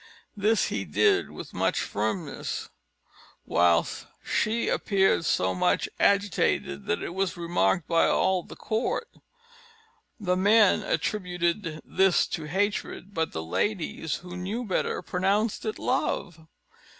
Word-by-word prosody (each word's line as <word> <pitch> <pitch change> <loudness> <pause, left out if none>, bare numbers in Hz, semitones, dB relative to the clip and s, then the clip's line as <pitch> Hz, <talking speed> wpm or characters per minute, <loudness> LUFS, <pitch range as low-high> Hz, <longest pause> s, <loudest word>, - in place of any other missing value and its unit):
This 215 +2 +2
he - - -2
did 410 -2 +2
with - - -9
much - - 0
firmness; 170 -7 -3 0.8
while 85 -1 +3 0.4
she 225 +2 0
appeared 195 -4 +2
so 95 -9 +1
much 90 - +1
agitated, 200 - +1
that - - 0
it - - -5
was 190 -1 -1
remarked 175 0 +1
by 165 -1 +3
all 190 -1 +2
the - - -12
court. 225 - -2 1.1
The 180 -3 0
men 205 +2 +5
attributed 175 -4 -1
this 190 -2 +3
to 160 - -4
hatred; 200 +2 -2
but 160 -2 -1
the 80 - -4
ladies, 165 - -2
who 180 0 -9
knew 200 +7 -3
better, 190 - -1
pronounced 200 +5 0
it 215 - -2
love. 160 -3 -2
185 Hz, 125 wpm, -27 LUFS, 165-205 Hz, 1.1 s, men